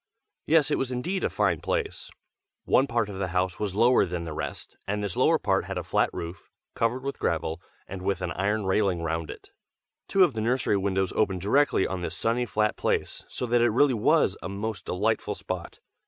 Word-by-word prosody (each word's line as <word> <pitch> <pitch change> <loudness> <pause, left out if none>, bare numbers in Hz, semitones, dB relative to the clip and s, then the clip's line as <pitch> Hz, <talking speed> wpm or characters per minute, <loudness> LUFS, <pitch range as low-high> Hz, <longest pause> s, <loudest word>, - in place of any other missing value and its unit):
Yes, 160 -2 +4
it - - +1
was 135 -1 -2
indeed 175 +10 -2
a - - +2
fine - - +1
place. 460 -4 -3 0.6
One 135 - +4
part 115 -3 0
of 100 -2 -7
the 95 - -1
house 90 +1 -1
was 100 -3 -2
lower 120 +4 +5
than 90 -2 -3
the 80 -2 -5
rest, - - -6
and 105 +1 -1
this 100 -4 -3
lower - - +4
part - - 0
had - - -4
a - - -2
flat - - +1
roof, 85 +2 -7 0.2
covered 120 +3 0
with 140 0 -4
gravel, 80 +1 -1 0.3
and 95 -1 -7
with 95 -1 -1
an 90 - -2
iron 100 +4 0
railing 95 -3 +1
round 80 -1 -2
it. - - -10 0.6
Two 195 - +5
of 170 -7 +3
the 110 - -3
nursery 120 -1 +1
windows 95 -1 0
opened 95 -4 +1
directly 135 +3 +3
on 95 -1 -3
this 85 -1 -4
sunny 120 +2 0
flat 105 -1 0
place, - - -1
so - - -3
that 120 0 +2
it 120 - +4
really 130 +4 +4
was 110 - +3
a - - -5
most 100 0 -4
delightful 105 +5 0
spot. - - -6
105 Hz, 210 wpm, -27 LUFS, 95-120 Hz, 0.6 s, lower